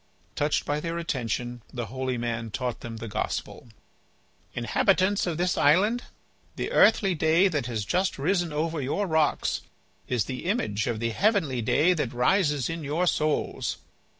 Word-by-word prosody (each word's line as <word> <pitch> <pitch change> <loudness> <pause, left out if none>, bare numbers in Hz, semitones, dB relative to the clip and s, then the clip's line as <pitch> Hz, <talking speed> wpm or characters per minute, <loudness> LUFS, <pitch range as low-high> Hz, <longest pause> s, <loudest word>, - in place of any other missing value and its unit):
Touched 145 +1 0
by 145 +1 -1
their 165 +2 -3
attention, 120 -6 -3
the 120 -2 -4
holy 130 +1 -3
man 115 -1 -3
taught 125 +2 -3
them 115 -1 -7
the 115 - -6
Gospel. 110 - -4 0.9
"Inhabitants 185 - +2
of 165 -3 -2
this 180 +1 0
island, 205 +11 +3 0.5
the - - -3
earthly 205 -3 +5
day 165 +4 +4
that 150 -9 -1
has 110 -4 -3
just 185 - 0
risen 175 +3 0
over 160 +1 -1
your 145 +10 -1
rocks 160 -4 +1 0.5
is 120 -4 0
the 130 +2 -6
image 135 - 0
of 115 -3 -1
the 115 0 -1
heavenly 160 - +1
day 155 +10 +3
that 150 -8 -2
rises 145 0 +2
in 165 -1 -4
your 155 +5 0
souls. 155 -3 0
150 Hz, 155 wpm, -26 LUFS, 120-180 Hz, 0.9 s, earthly